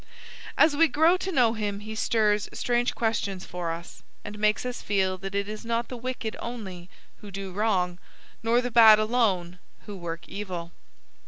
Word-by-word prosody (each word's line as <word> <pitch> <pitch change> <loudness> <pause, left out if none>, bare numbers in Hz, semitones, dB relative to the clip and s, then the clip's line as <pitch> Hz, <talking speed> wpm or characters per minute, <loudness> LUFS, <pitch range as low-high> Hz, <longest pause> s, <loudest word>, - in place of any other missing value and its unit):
As 310 -2 +5
we 330 +3 +5
grow 320 +4 +4
to 380 +1 -4
know 245 -8 +3
him 205 -2 -3
he 215 +1 -7
stirs 215 -1 +1
strange 240 0 0
questions 205 -5 -1
for 175 -2 -4
us, 170 +1 -8 0.2
and 210 0 -7
makes 215 +3 +2
us 250 -1 -4
feel 190 -2 +1
that 195 +1 -6
it 200 0 0
is 215 +1 -6
not 235 0 -1
the 255 - -5
wicked 245 -2 -4
only 190 -7 -7 0.3
who 210 - -11
do 195 0 -6
wrong, 185 -3 0 0.4
nor 230 +2 +3
the 245 0 -3
bad 220 -2 +8
alone 210 -6 0 0.3
who 205 - -7
work 170 -2 -6
evil. 180 -4 -6
210 Hz, 175 wpm, -26 LUFS, 190-235 Hz, 0.4 s, bad